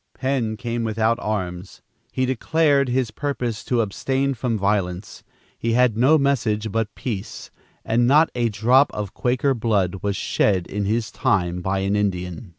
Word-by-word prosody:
Penn 125 -5 -1
came 120 0 -3
without 110 +1 0
arms; 95 -4 -4 0.3
he 130 - 0
declared 140 +2 +2
his 125 -2 0
purpose 120 -3 -3
to 120 -2 +1
abstain 135 +6 -1
from 120 -2 -2
violence; 100 -2 -2 0.4
he 115 0 0
had 125 -2 +3
no 130 +7 +5
message 110 -7 0
but 110 0 -2
peace, 105 -6 -6 0.3
and 120 +2 +2
not 150 +5 +5
a 120 -1 0
drop 125 +7 +3
of 105 -2 -4
Quaker 130 +4 +1
blood 105 -6 0
was 100 -1 -1
shed 95 -4 +1
in 100 0 -3
his 110 +2 -1
time 90 -3 0
by 95 +2 -1
an 100 +1 0
Indian. 90 -1 -2
115 Hz, 155 wpm, -22 LUFS, 100-125 Hz, 0.4 s, no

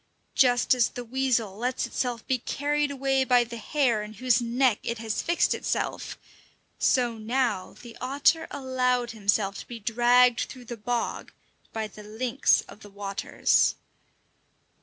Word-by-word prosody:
Just 245 -1 +4
as 245 -2 +2
the 245 - -7
weasel 240 -5 0
lets 250 +3 -1
itself 245 -3 -3
be 260 -1 0
carried 290 +4 -1
away 270 -1 +1
by 250 -2 +4
the 235 0 -8
hare 240 -2 +1
in 210 +1 -8
whose 245 +2 +2
neck 240 -1 +2
it 235 - -3
has 220 -1 -2
fixed 345 0 +2
itself, - - -3 0.6
so 240 -3 +2
now 225 -4 -1
the 235 -2 -11
otter 285 +5 +2
allowed 250 -3 0
himself 200 -2 0
to - - -10
be 235 -1 -8
dragged 240 +2 +3
through 255 -2 -11
the 240 - -6
bog 235 +2 -3 0.4
by 220 -1 -3
the 210 - -13
lynx 230 +6 +1
of - - -14
the 205 - -13
waters. 200 0 +1
245 Hz, 150 wpm, -26 LUFS, 220-260 Hz, 0.6 s, Just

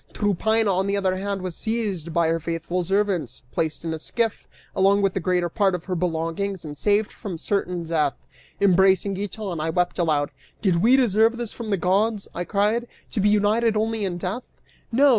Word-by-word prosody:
Tryphaena, 215 +1 +1
on 190 +2 0
the 200 0 +1
other 190 -2 +1
hand, 195 0 -3
was 180 -3 -4
seized 205 -8 -2
by 170 0 +2
her 165 +1 +1
faithful 170 +2 -2
servants, 190 - 0
placed 160 +1 -2
in 165 - -1
a 160 - -4
skiff, 225 +6 -2 0.3
along 200 +1 +4
with 195 -1 +2
the - - -1
greater 180 0 +1
part 190 +2 +1
of 170 - -6
her 185 - -3
belongings, 175 +2 -2
and 150 -1 -6
saved 205 +6 +1
from 195 -7 -6
certain 180 -1 -1
death. 155 -4 0 0.4
Embracing 190 0 +4
Giton, 195 -2 -4
I 160 +1 -1
wept 180 +2 0
aloud: 150 -4 +1 0.3
"Did 185 -5 +2
we 230 +9 +5
deserve 230 -2 +3
this 240 -3 -4
from 230 -2 -6
the 200 - +2
gods," 200 +4 +1
I 175 - -3
cried, 215 +5 +1 0.2
"to - - -2
be 205 +1 +4
united 215 +2 +3
only 220 0 0
in 180 -3 -2
death? 185 +7 -3 0.5
No! 275 +5 +5
195 Hz, 195 wpm, -24 LUFS, 170-210 Hz, 0.5 s, we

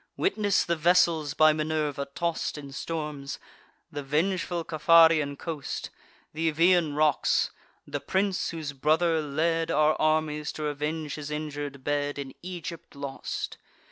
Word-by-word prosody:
Witness 210 - +2
the 170 - +1
vessels 165 -2 +3
by 155 0 +6
Minerva 150 -2 -1
toss'd 170 -2 -1
In 140 -2 -8
storms; 150 -2 -4 0.5
the 145 - -4
vengeful 170 +4 0
Capharean 160 -2 +5
coast; 155 -4 -5 0.4
Th' 155 - -9
Euboean 165 -1 +3
rocks! 150 -1 +2 0.3
the - - -4
prince, 190 0 0
whose 155 -3 -5
brother 160 +4 +2
led 165 +3 0
Our 155 +1 +4
armies 155 -1 +1
to 155 - -5
revenge 150 +1 -2
his 150 -1 -6
injur'd 145 -2 -5
bed, 145 0 -1
In 140 -2 -6
Egypt 175 -3 -7
lost! 140 -1 -5
155 Hz, 130 wpm, -27 LUFS, 145-165 Hz, 0.5 s, by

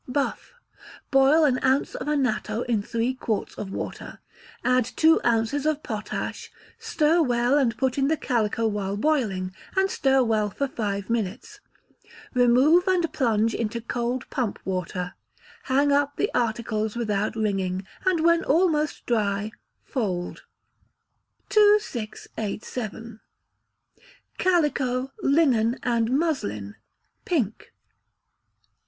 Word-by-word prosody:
Buff. 280 - -2 0.6
Boil 275 +4 +5
an 260 -4 +2
ounce 265 +1 +2
of - - -6
anatto 245 -5 0
in 230 -4 0
three 230 +4 -1
quarts 225 -5 -3
of 200 - -6
water, - - -6 0.5
add 250 +1 +3
two 320 +7 +3
ounces 235 +4 +1
of 310 -1 0
potash, 215 -2 -5 0.3
stir 315 +2 +2
well, 245 -2 +2
and 245 -6 +2
put 265 0 0
in 270 - +2
the 315 +2 +1
calico 230 -4 0
while 205 -2 -1
boiling, 205 -9 0 0.2
and 385 0 +2
stir 270 -1 +3
well 215 -3 +1
for 280 +7 -2
five 200 -6 -3
minutes; 230 - -3 0.7
remove 260 +9 +4
and 355 -3 +1
plunge 225 -4 +1
into 230 +1 -2
cold 240 +1 -3
pump 245 -7 -2
water, 180 -1 -3 0.5
hang 280 +2 +2
up 285 0 +2
the 410 - 0
articles 220 -2 -1
without 215 -2 -1
wringing, 195 -3 -1 0.2
and 370 -4 +2
when 335 +1 +4
almost 310 -1 +1
dry, 210 -2 0 0.3
fold. 185 -9 -3 1.1
2687. 230 - -1 1.2
Calico, 275 -7 +1
Linen, 260 -6 +3
and 230 -2 +1
Muslin 250 - -1 0.5
(Pink). 245 - -2
245 Hz, 115 wpm, -25 LUFS, 215-285 Hz, 1.2 s, Boil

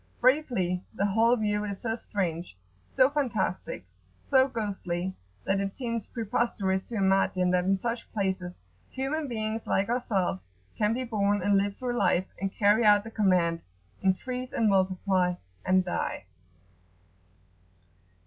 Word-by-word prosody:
Briefly, 240 - +2
the 200 - +1
whole 225 +4 +4
view 210 -1 0
is 200 -2 -4
so 225 -1 -2
strange, 175 - -3 0.3
so 260 - +4
fantastic, 240 - -2 0.3
so 260 - +3
ghostly, 190 -6 -3 0.3
that 195 0 +1
it 195 0 -3
seems 230 -4 -3
preposterous 220 -4 -1
to 235 - -7
imagine 190 -2 +2
that 180 0 +2
in 195 +1 +3
such 235 +3 -4
places 190 -3 -1 0.4
human 285 +3 -2
beings 220 -2 -2
like 195 +3 +1
ourselves 210 - 0 0.3
can 210 -1 +1
be 255 - -2
born, 205 -4 0
and 205 +1 +3
live 200 0 +1
through 245 -1 -2
life, 185 - +3 0.2
and 195 0 -1
carry 210 +3 +3
out 205 -1 +6
the 225 - -9
command 180 -6 +2 0.4
"increase 250 +7 -1
and 225 - +1
multiply," 185 -1 +2 0.3
and 185 0 +3
die. 175 - -3
205 Hz, 140 wpm, -28 LUFS, 190-235 Hz, 0.4 s, out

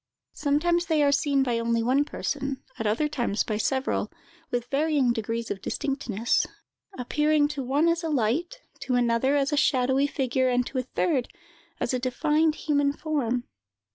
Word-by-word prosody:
Sometimes 340 +4 +1
they 310 -3 +3
are 285 - +4
seen 280 -1 +2
by 240 -3 0
only 230 0 0
one 265 +5 +2
person, 275 -2 -4 0.2
at 225 - -1
other 230 +9 +1
times 240 -8 -1
by 215 - -2
several, 265 +5 -1 0.4
with 245 -1 -2
varying 280 -3 +2
degrees 230 +1 -3
of 190 - -4
distinctness, 235 -5 -1 0.5
appearing 300 +4 +2
to 295 -2 -4
one 280 +6 +1
as 335 +1 +1
a 325 - -2
light, 280 +5 0 0.2
to 255 - -1
another 245 +3 +2
as 285 +1 0
a - - +1
shadowy 265 -1 +2
figure, 260 -2 0
and 250 0 +1
to 260 - -3
a - - +1
third 260 +1 -1 0.5
as - - -1
a 255 - +1
defined 300 +5 +1
human 285 -2 +1
form. 265 -6 -1
270 Hz, 170 wpm, -26 LUFS, 245-295 Hz, 0.5 s, are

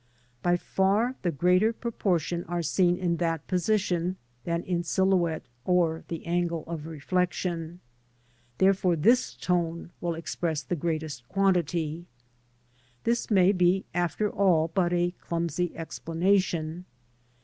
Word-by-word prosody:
By 175 0 +2
far 200 +7 +1
the 180 - 0
greater 180 +8 +3
proportion 180 - -1
are 175 0 -2
seen 175 +3 +2
in 175 -2 0
that 165 -3 -1
position 185 -1 0 0.3
than 170 0 -1
in 175 -2 -1
silhouette 175 -2 +1 0.2
or 170 -2 +1
the 165 - -6
angle 170 -1 -1
of 160 -2 -6
reflection, 175 +1 -2 0.8
therefore 190 -2 +3
this 235 +11 +3
tone 170 -1 -1
will 170 -1 -1
express 160 -1 -3
the 175 - -2
greatest 155 -6 -3
quantity. 175 -4 0 1.0
This 235 +1 0
may 190 -3 +5
be 180 0 +2
after 175 +4 0
all 175 -6 +2
but 175 +1 +1
a 175 0 +1
clumsy 170 0 -2
explanation. 170 0 0
175 Hz, 120 wpm, -27 LUFS, 165-185 Hz, 1.0 s, may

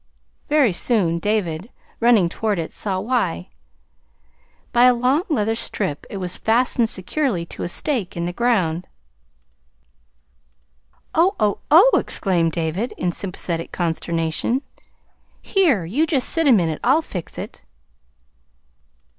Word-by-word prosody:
Very 285 -9 +3
soon 175 -5 +1
David, 195 -2 -1 0.3
running 230 -6 +4
toward 210 +4 -2
it, 165 -1 -4
saw 190 -3 -3
why. 195 - -1 1.2
By 240 +1 +5
a 250 -1 +6
long 255 +6 +2
leather 225 -7 +1
strip 190 -8 -3
it 200 - -6
was 180 -2 -5
fastened 235 0 +2
securely 195 - -1
to - - -10
a - - -2
stake 200 - -2
in 170 - -2
the 175 - -3
ground. 185 -7 0 2.3
"Oh, 365 +5 +3
oh, 210 -1 +1
oh!" - - +7
exclaimed 170 -4 0
David, 170 +8 -2
in 180 - -1
sympathetic 175 -3 -4
consternation. 165 - -1 0.8
"Here, 310 - +2
you 280 - 0
just 275 -5 +1
wait 325 -2 +2
a - - +7
minute. 170 -9 +2
I'll 285 +6 +3
fix 180 - -7
it." - - -8
205 Hz, 125 wpm, -21 LUFS, 170-250 Hz, 2.3 s, oh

